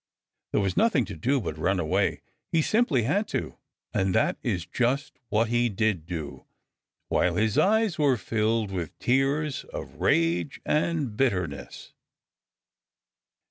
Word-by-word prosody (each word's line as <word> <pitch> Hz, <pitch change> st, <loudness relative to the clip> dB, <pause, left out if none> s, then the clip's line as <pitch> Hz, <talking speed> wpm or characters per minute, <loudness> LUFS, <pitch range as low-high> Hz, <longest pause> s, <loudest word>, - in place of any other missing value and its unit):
There -, -, +2 dB
was 95 Hz, -2 st, -1 dB
nothing 180 Hz, -, +3 dB
to -, -, -7 dB
do 130 Hz, -, +1 dB
but 80 Hz, -9 st, -5 dB
run 95 Hz, +3 st, +1 dB
away. 80 Hz, -2 st, 0 dB, 0.3 s
He 160 Hz, -1 st, +3 dB
simply 215 Hz, -, +2 dB
had 195 Hz, -, +1 dB
to. -, -, -4 dB, 0.3 s
And 95 Hz, -1 st, +1 dB
that -, -, +2 dB
is 85 Hz, -2 st, -2 dB
just 130 Hz, +7 st, -1 dB
what 110 Hz, +1 st, +2 dB
he 120 Hz, 0 st, +2 dB
did 100 Hz, -5 st, -1 dB
do, 80 Hz, -5 st, -6 dB, 0.6 s
while -, -, +2 dB
his 110 Hz, -1 st, +1 dB
eyes 215 Hz, -4 st, +3 dB
were 140 Hz, -4 st, +3 dB
filled 110 Hz, 0 st, 0 dB
with 90 Hz, -4 st, -4 dB
tears 135 Hz, +3 st, +1 dB
of -, -, -8 dB
rage 85 Hz, -1 st, +1 dB
and 150 Hz, -6 st, 0 dB
bitterness. 105 Hz, -9 st, -2 dB
115 Hz, 140 wpm, -27 LUFS, 95-140 Hz, 0.6 s, nothing